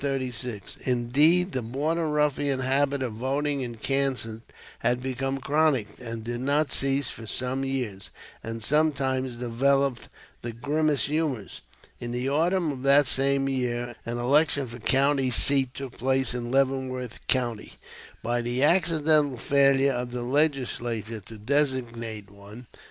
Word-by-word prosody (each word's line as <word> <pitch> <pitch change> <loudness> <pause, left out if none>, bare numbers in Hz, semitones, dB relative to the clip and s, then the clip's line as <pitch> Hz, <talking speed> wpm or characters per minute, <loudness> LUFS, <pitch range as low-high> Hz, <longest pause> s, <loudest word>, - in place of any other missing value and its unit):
Indeed, 145 +9 +3
the 130 - -2
Border 150 +8 -2
Ruffian 145 -2 +1
habit 135 +1 +1
of 120 -4 -3
voting 140 +4 -1
in 120 -2 -5
Kansas 130 -3 -1 0.4
had 120 +1 +1
become 135 +1 -3
chronic, 140 -5 +1
and 115 -2 -6
did 120 +1 -4
not 145 +3 +1
cease 135 +1 +1
for 115 - -9
some 130 +4 -2
years, 125 -8 -4 0.3
and 115 0 -6
sometimes 135 -3 0
developed 135 +2 0 0.3
the 120 -1 -5
grimmest 145 +5 0
humors. 145 -8 -3 0.4
In 120 - -5
the 125 +2 -2
autumn 165 +3 +1
of 130 -2 -7
that 140 +2 +6
same 135 +1 +2
year 120 -2 -2
an 120 +1 -4
election 140 +3 +2
for 120 0 -10
county 135 +3 +2
seat 135 0 +4
took 135 -3 -8
place 130 -1 +1
in 120 -1 -4
Leavenworth 130 -2 -1
County 120 -4 -1 0.5
by 120 +1 0
the 120 +3 0
accidental 155 -4 +3
failure 140 +1 +3
of 125 0 -3
the 120 0 -5
Legislature 120 -5 -1
to 110 - -10
designate 115 -4 -2
one. 100 +4 -13
130 Hz, 135 wpm, -26 LUFS, 120-140 Hz, 0.5 s, that